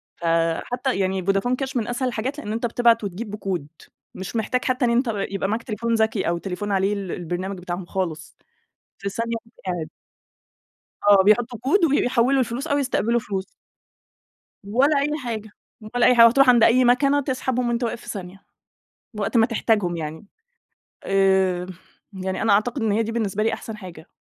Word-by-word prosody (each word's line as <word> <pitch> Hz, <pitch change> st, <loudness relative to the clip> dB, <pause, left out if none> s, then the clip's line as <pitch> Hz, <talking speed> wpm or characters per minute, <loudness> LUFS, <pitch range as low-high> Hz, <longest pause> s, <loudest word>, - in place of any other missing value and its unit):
فحتى 165 Hz, +9 st, 0 dB
يعني 190 Hz, -1 st, 0 dB
فودافون 195 Hz, +6 st, +1 dB
كاش 265 Hz, 0 st, -5 dB
من 225 Hz, -2 st, -1 dB
أسهل 245 Hz, +1 st, -1 dB
الحاجات 250 Hz, +4 st, -3 dB
لأن 210 Hz, -6 st, -5 dB
أنت 230 Hz, +2 st, -2 dB
بتبعت 235 Hz, -1 st, +3 dB
وتجيب 205 Hz, +2 st, -5 dB
بكود 190 Hz, -8 st, -4 dB, 0.5 s
مش 190 Hz, +4 st, -7 dB
محتاج 250 Hz, +3 st, -1 dB
حتى 255 Hz, 0 st, +1 dB
إن -, -, +2 dB
أنت 240 Hz, 0 st, +2 dB
ب -, -, 0 dB, 0.2 s
يبقى 195 Hz, 0 st, -2 dB
معاك 225 Hz, +2 st, -2 dB
تليفون 230 Hz, +1 st, -2 dB
ذكي 220 Hz, -2 st, +1 dB
أو 170 Hz, -, 0 dB
تليفون 195 Hz, +3 st, -4 dB
عليه 195 Hz, +1 st, +1 dB
ال 195 Hz, -3 st, -4 dB
البرنامج 180 Hz, +3 st, -4 dB
بتاعهم 180 Hz, 0 st, -5 dB
خالص، 165 Hz, -5 st, -4 dB, 0.6 s
في 200 Hz, -, -4 dB
ثانية 230 Hz, +3 st, -3 dB
وأنت 230 Hz, -, -25 dB
قاعد. 175 Hz, -4 st, -3 dB, 1.2 s
آه، 195 Hz, -2 st, +7 dB
بيحطوا 230 Hz, +3 st, +2 dB
كود 320 Hz, -, +3 dB
وبي 285 Hz, -2 st, +2 dB
بيحوِّلوا 255 Hz, +2 st, +2 dB
الفلوس 255 Hz, +4 st, -2 dB
أو 285 Hz, -, +1 dB
يستقبلوا 240 Hz, -4 st, +1 dB
فلوس. 195 Hz, -3 st, -4 dB, 1.2 s
ولا 275 Hz, +7 st, +3 dB
أي 285 Hz, +2 st, 0 dB
حاجة، 220 Hz, -3 st, -4 dB, 0.5 s
ولا 245 Hz, -, +4 dB
أي 250 Hz, -, +6 dB
حاجة، 230 Hz, -1 st, +9 dB
وهتروح 255 Hz, +3 st, +5 dB
عند 240 Hz, -2 st, +6 dB
أي 250 Hz, +2 st, +5 dB
مكنة 275 Hz, +4 st, +3 dB
تسحبهم 255 Hz, -2 st, -1 dB
وأنت 235 Hz, +1 st, -1 dB
واقف 235 Hz, 0 st, -3 dB
في -, -, -11 dB
ثانية، 195 Hz, -1 st, -7 dB, 0.7 s
وقت 210 Hz, +3 st, -1 dB
ما 225 Hz, -, +6 dB
تحتاجهم 210 Hz, -6 st, 0 dB
يعني. 160 Hz, +4 st, -6 dB, 0.8 s
آآ 190 Hz, -2 st, +2 dB, 0.5 s
يعني 190 Hz, +1 st, -4 dB
أنا 225 Hz, -, +3 dB
أعتقد 235 Hz, +5 st, +1 dB
إن 215 Hz, -2 st, +1 dB
هي 225 Hz, -, +2 dB
دي 225 Hz, +1 st, -4 dB
بالنسبة 215 Hz, -3 st, -1 dB
لي 225 Hz, -, +1 dB
أحسن 225 Hz, -, -6 dB
حاجة، 180 Hz, -6 st, -11 dB
220 Hz, 180 wpm, -23 LUFS, 190-245 Hz, 1.2 s, حاجة